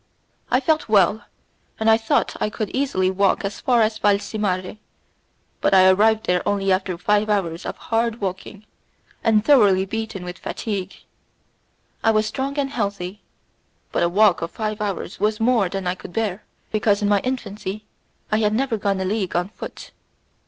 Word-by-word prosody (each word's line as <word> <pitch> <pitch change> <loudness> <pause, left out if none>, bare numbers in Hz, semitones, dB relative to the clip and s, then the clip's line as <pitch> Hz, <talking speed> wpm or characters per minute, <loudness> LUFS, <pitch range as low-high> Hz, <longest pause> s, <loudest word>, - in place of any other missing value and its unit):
I 250 - +3
felt 310 -1 0
well, 205 0 +3 0.5
and 220 - 0
I 220 - +7
thought 225 0 0
I - - +1
could 215 -1 -4
easily 190 -9 0
walk 195 +1 +1
as 200 - -4
far 240 -3 +3
as 215 0 -1
Valcimare, 200 -1 0 0.8
but - - +3
I 185 0 +7
arrived 220 +3 +3
there 180 0 +1
only 195 -1 0
after 185 -1 0
five 210 +4 +1
hours 175 -5 -1
of - - -5
hard 230 0 -1
walking, 195 +2 -5 0.6
and 215 -1 +3
thoroughly 205 -10 +5
beaten 220 -2 -5
with 180 +1 -7
fatigue. 195 -4 -4 1.1
I 225 - +4
was 215 -1 +3
strong 270 +6 -3
and 275 -1 -1
healthy, 200 -4 -3 0.7
but - - 0
a 170 - +3
walk 200 +1 +4
of 165 - -3
five 215 +2 -4
hours 195 -3 -4
was 215 0 0
more 225 -5 +2
than 195 0 -4
I 180 - +1
could 180 -1 -11
bear, 215 -3 -2 0.3
because 210 -1 +1
in - - +2
my 205 -1 +3
infancy 210 -4 -4 0.5
I 215 - +3
had 210 -1 +1
never 255 -2 0
gone 200 -2 -1
a - - -1
league 195 -2 -2
on 175 +2 0
foot. - - -9
210 Hz, 175 wpm, -22 LUFS, 190-220 Hz, 1.1 s, I